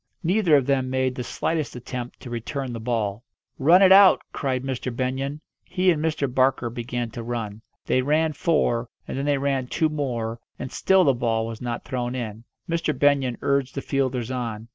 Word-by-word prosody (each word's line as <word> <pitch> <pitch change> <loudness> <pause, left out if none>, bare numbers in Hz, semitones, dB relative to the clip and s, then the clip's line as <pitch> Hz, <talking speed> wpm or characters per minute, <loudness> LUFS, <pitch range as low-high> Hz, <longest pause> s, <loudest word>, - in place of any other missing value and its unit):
Neither 180 -2 +3
of 140 -3 +3
them 135 -1 +1
made 130 0 0
the 125 - -4
slightest 155 +2 -2
attempt 125 0 -6
to 125 - -9
return 125 +2 -4
the 115 - -5
ball. 110 -2 -2 0.4
"Run 170 +8 +6
it 190 - +7
out!" 195 0 +8
cried 130 -3 -1
Mr. 130 -1 -3
Benyon. 130 +4 -3 0.2
He 185 0 +2
and 155 -2 -1
Mr. 155 -3 0
Barker 130 -2 +2
began 120 0 -4
to 115 - -6
run. 115 -3 -4 0.2
They 130 - +2
ran 155 +3 +1
four, 135 -7 +1 0.2
and - - -5
then 135 +1 -2
they 145 -1 +2
ran 135 -2 -1
two 160 +4 +1
more, 120 -6 -3 0.2
and 125 - -6
still 190 -1 +3
the 140 - +4
ball 115 -2 0
was 115 -1 -7
not 120 -1 -4
thrown 125 -1 -3
in. 115 -2 -5 0.2
Mr. 165 -2 -1
Benyon 140 -4 +2
urged 140 -2 0
the 135 - -2
fielders 130 -3 -1
on. 115 -3 -4
130 Hz, 190 wpm, -24 LUFS, 120-145 Hz, 0.4 s, out